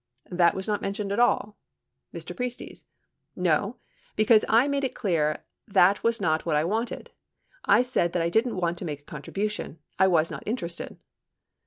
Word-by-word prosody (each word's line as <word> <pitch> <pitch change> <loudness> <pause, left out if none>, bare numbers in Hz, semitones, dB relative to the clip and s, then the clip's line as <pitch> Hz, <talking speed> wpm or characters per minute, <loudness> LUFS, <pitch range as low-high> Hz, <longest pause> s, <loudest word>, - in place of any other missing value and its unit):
That 175 -1 +3
was 190 +2 -4
not 210 -1 -1
mentioned 200 0 -3
at 200 - 0
all? 215 -3 +1 0.5
Mr. - - -8
Priestes. 250 -1 -6 0.5
No, - - +1 0.4
because 215 0 +5
I 235 +5 +5
made 280 -1 -1
it 260 -2 -2
clear 165 -9 0 0.2
that 195 -1 +4
was 230 0 +1
not 160 -1 +1
what 160 -3 0
I 150 - +2
wanted. 220 +8 -3 0.5
I - - +5
said 210 -9 0
that 175 - +1
I 170 - +1
didn't 225 +4 +1
want 175 -1 -1
to - - -5
make 145 -3 -5
a - - -36
contribution. 195 +4 -4 0.2
I 190 - +6
was 165 -3 +2
not - - -6
interested. 175 -7 -4
195 Hz, 175 wpm, -26 LUFS, 170-230 Hz, 0.5 s, I